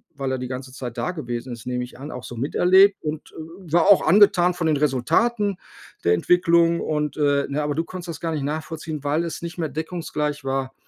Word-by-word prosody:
weil 135 -1 -3
er 130 - -1
die 125 - -4
ganze 130 0 -6
Zeit 125 -3 -7
da 180 - -1
gewesen 120 -6 -5
ist, 115 - -10
nehme 125 0 -2
ich 125 +1 -11
an, 145 +3 -7
auch 125 - -7
so 120 - -8
miterlebt 185 - +4
und 155 0 -5 0.3
war 170 -2 +1
auch 195 - +5
angetan 180 -1 +5
von 170 -2 -2
den 155 - +2
Resultaten 195 - +1 0.5
der 85 - +4
Entwicklung. 170 - +3
Und, 150 -1 -2
äh, 145 -1 +2
ne, 145 +2 -1
aber 145 -1 -2
du 165 - 0
konntest 175 0 -8
das 160 - -6
gar 165 -1 -3
nicht 150 -3 -2
nachvollziehen, 155 0 -5
weil 150 +4 0
es 165 - -5
nicht 170 +1 -6
mehr 160 -3 -2
deckungsgleich 155 -3 -3
war 135 0 -2
150 Hz, 215 wpm, -23 LUFS, 135-170 Hz, 0.5 s, auch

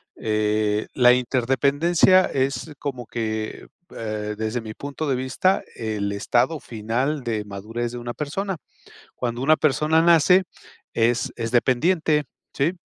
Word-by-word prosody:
Eh, 105 0 0
la 125 -1 +6
interdependencia, 140 +9 +3
es 135 +4 -2
como 130 -4 -5
que, 110 -1 -4 0.3
eh, 105 -1 -4
desde 110 +2 -2
mi 110 -1 -7
punto 145 +4 -5
de 130 - +2
vista, 130 +9 +1
el 105 -3 -3
estado 120 +9 +1
final 125 +6 -2
de 110 -3 -2
madurez, 110 +4 -5
de 120 - -6
una 120 0 -5
persona. 190 +8 -3 0.6
Cuando 120 0 -3
una 155 +3 +5
persona 155 +2 +2
nace, 170 +3 +5 0.5
es 115 0 +1
es 115 -1 -3
dependiente, 150 +5 +2 0.3
¿sí? 145 +5 +1
125 Hz, 130 wpm, -23 LUFS, 110-150 Hz, 0.6 s, la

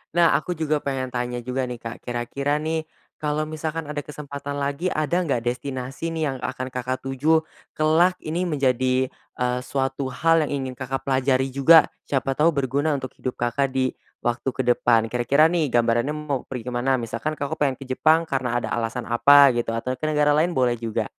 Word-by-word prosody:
Nah 170 -1 +6
aku 180 +3 -3
juga 155 -1 0
pengen 130 -2 -2
tanya 125 0 -3
juga 125 +2 -2
nih, 125 -1 -6
Kak. 115 0 -6
Kira-kira 125 +4 -2
nih 160 0 -2 0.3
kalau 150 0 -2
misalkan 155 0 -4
ada 150 -1 -4
kesempatan 145 -1 -6
lagi, 145 +6 -1
ada 155 +3 0
enggak 135 -7 0
destinasi 130 +5 -4
nih 160 -1 -2
yang - - -6
akan 130 0 -3
Kakak 125 +1 -3
tuju, 145 +5 +2 0.3
kelak 165 +4 +3
Ini 165 +4 -2
menjadi, 130 -4 +1 0.3
eee, 125 0 0
suatu 135 0 -2
hal 160 +4 +3
yang - - -6
ingin 130 -1 -5
Kakak 135 +1 -3
pelajari 130 0 +2
juga, 140 +5 +6 0.2
siapa 135 -1 -1
tahu 160 +4 +4
berguna 140 +2 0
untuk 130 -2 -5
hidup 130 - -3
Kakak 135 +3 0
di 130 -1 0 0.3
waktu 120 +2 0
ke 130 0 -3
depan. 120 -2 +3
Kira-kira 125 +6 +3
nih 160 -5 +1
gambarannya 120 +3 +2
mau 150 -3 -2
pergi 125 -3 -5
ke - - -2
mana? 130 +2 +1
Misalkan 115 +5 -3
Kakak 145 +2 -2
pengen 135 -3 +1
ke 135 - -8
Jepang 160 +5 +3
karena 130 -4 -1
ada - - -4
alasan 120 +1 -3
apa 140 +4 +7
gitu, 120 -1 -1
atau 125 +3 -2
ke 140 - -4
negara 150 -1 +3
lain 160 +4 +3
boleh 125 -3 +2
juga. 115 -1 -2
135 Hz, 190 wpm, -23 LUFS, 125-150 Hz, 0.3 s, apa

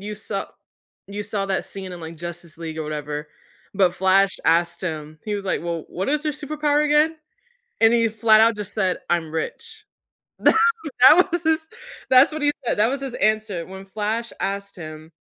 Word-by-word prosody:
you 210 +1 -5
saw 200 -1 -4 0.6
you 205 +1 -5
saw 200 -1 -2
that 195 - -1
scene 190 -2 -7
in, 175 - -8
like, 165 0 -8
Justice 170 -1 -8
League 160 -1 -6
or 160 - -1
whatever, 150 0 -5 0.5
but 185 -3 +3
Flash 190 +1 +3
asked 170 +1 +2
him, 155 -3 -5
he 210 - -2
was 200 -1 -4
like, 185 - -1
"Well, 170 -2 -3
what 185 - -3
is 300 +2 0
your 305 - 0
superpower 300 0 0
again?" 300 +2 +3 0.6
and 225 0 +6
he 230 -1 +3
flat 220 0 +4
out 225 0 +4
just 210 -1 -6
said, 190 -4 0
"I'm 170 -2 0
rich." 440 - -5 0.6
Tha - - +5 0.5
that 355 +8 +7
was 345 0 -1
his 320 0 +4
his 320 - -24 0.4
that's 260 +3 +6
what 310 0 -5
he 290 - +4
said, - - 0
that 215 - +5
was 275 +3 -2
his 270 -3 -5
answer 215 -5 0
when 190 +1 -10
Flash 220 +3 -3
asked 200 0 -3
him 155 -1 -9
200 Hz, 195 wpm, -22 LUFS, 170-250 Hz, 0.6 s, that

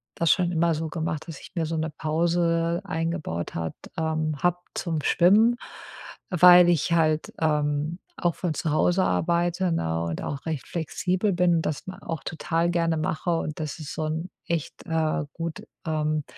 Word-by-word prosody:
das 170 -2 +3
schon 180 -2 +2
immer 170 -1 +2
so 160 +1 -3
gemacht, 160 0 -3
dass 160 - -7
ich - - -12
mir 165 -2 0
so 160 +1 -2
'ne 160 +1 -1
Pause 165 +2 +1
eingebaut 165 - -3
hat 80 -1 -3 0.2
ähm, 155 -1 0
habe 175 0 +2 0.2
zum 165 -4 -2
Schwimmen, 210 +7 +5 0.7
weil 180 -1 +8
ich 170 0 +2
halt, 155 -2 +2
ähm, 150 +2 0 0.2
auch 175 -2 +1
von 175 -4 -2
zu 155 - -2
Hause 175 +4 +3
arbeite, 175 - +1
ne, 80 - -1
und 85 -1 -3
auch 140 -1 -5
recht 160 -4 -3
flexibel 180 +4 -1
bin 175 -1 +3
und 160 - -1
das 150 - -3
ma 185 - -7
auch 165 -4 -5
total 165 +1 -1
gerne 165 -1 +1
mache 160 +2 -1
und 155 -2 -4
das 155 -2 -4
ist 150 -3 -6
so 155 - -2
'n 160 +3 -3 0.2
echt 170 0 -3
äh, 160 -2 0
gut, 165 -1 -5 0.2
ähm, 155 -1 0
165 Hz, 175 wpm, -26 LUFS, 155-175 Hz, 0.7 s, weil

